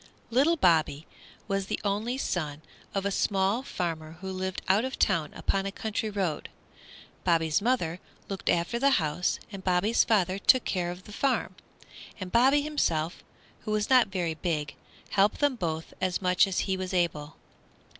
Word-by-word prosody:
Little 280 +8 +4
Bobby 160 - +2 0.4
was 195 -1 -1
the - - -2
only 215 +5 -1
son 155 - -3 0.3
of 195 0 -1
a 200 - +1
small 195 +3 +1
farmer 165 - -4
who 190 +3 -7
lived 190 0 -4
out 195 +4 +4
of 260 0 -4
town 165 -6 +1
upon 195 0 -1
a - - -3
country 220 +1 -3
road. 190 -7 -2 0.7
Bobby's 165 -2 +2
mother 195 -8 0 0.3
looked 195 -1 -4
after 175 +8 +1
the 275 +1 +4
house 155 +2 0
and 195 -2 -8
Bobby's 190 +5 +3
father 195 -4 +1
took 255 +5 +5
care 175 -3 -1
of 180 +1 -7
the 210 - -12
farm, 270 +3 0 0.7
and 185 -2 -6
Bobby 265 +5 +4
himself, 170 - -1 0.4
who - - -8
was 215 +2 0
not 255 -3 +6
very 180 -4 -2
big, 155 -3 -2 0.4
helped 200 +1 +3
them 290 -3 +2
both 165 -6 -4
as 185 -1 0
much 180 0 +3
as 190 - 0
he 190 - -1
was 185 0 -4
able. 155 -4 -1
190 Hz, 165 wpm, -28 LUFS, 170-215 Hz, 0.7 s, not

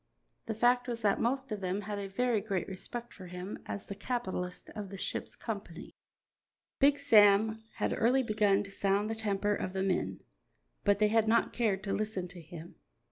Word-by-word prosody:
The 220 - -2
fact 245 +2 +3
was 235 -2 -4
that 200 -2 +3
the - - -4
most 265 +1 0
of 210 -2 -3
them 190 +2 -1
had 205 0 -4
a 200 - -4
very 225 +2 +1
great 195 -3 -2
respect 235 +5 -6
for 185 -3 -10
him 180 +3 -6
as 200 - -5
the - - -5
capitalist 195 -5 -4
of 210 -3 -6
the 195 - -7
ship's - - -3
company. 200 -7 -6 0.9
Big 285 +1 +5
Sam 220 -4 +5
had - - 0
early 250 +4 +3
begun 210 -3 +2
to 200 - -10
sound 200 +2 +1
the - - -2
temper 205 -1 0
of 185 -2 -3
the 190 0 0
men, 195 -1 -1 0.6
but 205 -1 +4
they 210 0 +3
had 225 0 +3
not 230 +1 +3
cared 210 -5 0
to 200 - -2
listen 210 -4 -2
to 175 -1 -10
him. 165 +1 -11
205 Hz, 195 wpm, -32 LUFS, 195-225 Hz, 0.9 s, Big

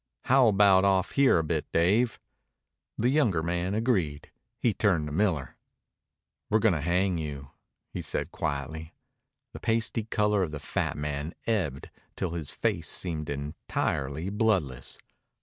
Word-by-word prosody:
"How 130 -1 +5
about 100 -2 +5
off 95 -1 +2
here 140 -7 +4
a 80 - +1
bit, 80 -1 -2
Dave?" 105 +8 +2 0.8
The 120 +3 +2
younger 115 - +2
man 90 +3 -1
agreed. 95 - 0 0.3
He 115 - +1
turned 95 -6 +2
to 75 - -5
Miller. 80 -7 0 0.9
"We're 110 - +4
going 110 -3 +3
to 80 - -1
hang 90 +2 +1
you," 70 -3 -6 0.4
he - - -3
said - - -3
quietly. 80 +3 -4 0.6
The - - -8
pasty 115 +1 0
color 105 -2 +1
of 90 - 0
the 75 -1 -6
fat - - -2
man 75 +2 -4
ebbed 90 - -1 0.2
till 90 - -2
his 80 -4 -3
face - - -1
seemed 80 -5 -1
entirely 70 +2 -3
bloodless. 95 - 0
90 Hz, 145 wpm, -28 LUFS, 75-105 Hz, 0.9 s, How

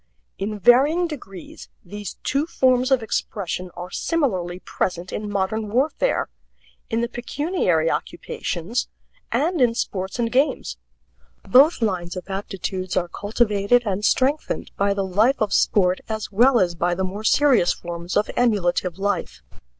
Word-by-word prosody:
In 210 +2 -3
varying 275 - +4
degrees 195 - -10 0.2
these 205 +1 -7
two 280 +4 0
forms 255 -4 +2
of 260 -4 +3
expression 185 -4 -3
are 180 +1 -7
similarly 190 - -1
present 180 -1 -3
in 210 -1 -4
modern 205 +2 -1
warfare, 280 - +1 0.6
in 225 +1 0
the 235 - 0
pecuniary 245 - -1
occupations, 235 - -3 0.4
and 330 +1 +1
in 235 -2 +3
sports 190 -3 -3
and 230 -1 -1
games. 270 +4 0 0.7
Both 270 +1 +5
lines 180 -4 -1
of 185 +1 -7
aptitudes 190 -1 -4
are 175 -1 0
cultivated 210 +3 +1
and 200 0 -2
strengthened 270 +7 0
by 200 0 +1
the 195 -1 -1
life 215 +9 +2
of 210 -2 0
sport 185 -2 +2
as 220 -1 -4
well 240 +5 +5
as 175 -2 +2
by 175 +1 0
the 190 - -2
more 195 +3 -4
serious 250 -7 +4
forms 170 +1 -4
of 210 - +1
emulative 185 -6 +1
life. 195 - -2
205 Hz, 140 wpm, -22 LUFS, 185-250 Hz, 0.7 s, Both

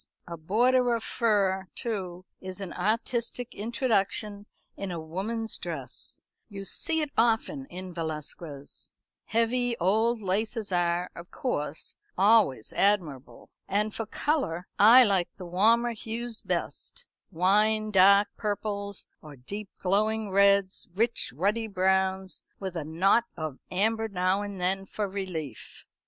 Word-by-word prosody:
A 170 - -6
border 240 +9 +2
of 230 - -4
fur, 195 -5 +1
too, 185 -6 -4
is 185 +1 -7
an 190 -3 -6
artistic 235 +4 -1
introduction 210 -2 -1 0.3
in 195 - -5
a 175 -2 -4
woman's 205 +8 -3
dress - - -5 0.3
you 195 -2 -7
see 320 - -1
it 300 -2 -2
often 235 +5 +1
in 185 -3 -8
Velasquez. 155 -3 -6 0.3
Heavy 235 +1 +1
old 220 +6 +2
laces 210 +2 -1
are, 175 0 +1
of 170 +1 -10
course, 150 - -3 0.2
always 195 - +4
admirable. 175 -10 0 0.2
And 210 +2 0
for 225 - -4
colour 220 - -1
I 235 +5 +9
like 195 -6 +2
the 185 - -9
warmer 225 +7 +3
hues 230 +1 -5
best 485 0 -4 0.2
wine 210 +4 +2
dark 200 +1 +6
purples 205 -1 -3 0.2
or 150 -2 -11
deep 195 +11 -7
glowing 210 +2 +1
reds; 200 -1 +3
rich 230 +3 +1
ruddy 205 - 0
browns, 190 -1 0 0.2
with 190 -2 -5
a 165 - -2
knot 185 +9 +3
of 155 -4 -5
amber 220 +4 +1
now 185 0 +1
and 200 -2 -6
then 190 +2 -1
for 210 +1 -2
relief." 180 - -6
200 Hz, 130 wpm, -28 LUFS, 180-225 Hz, 0.3 s, I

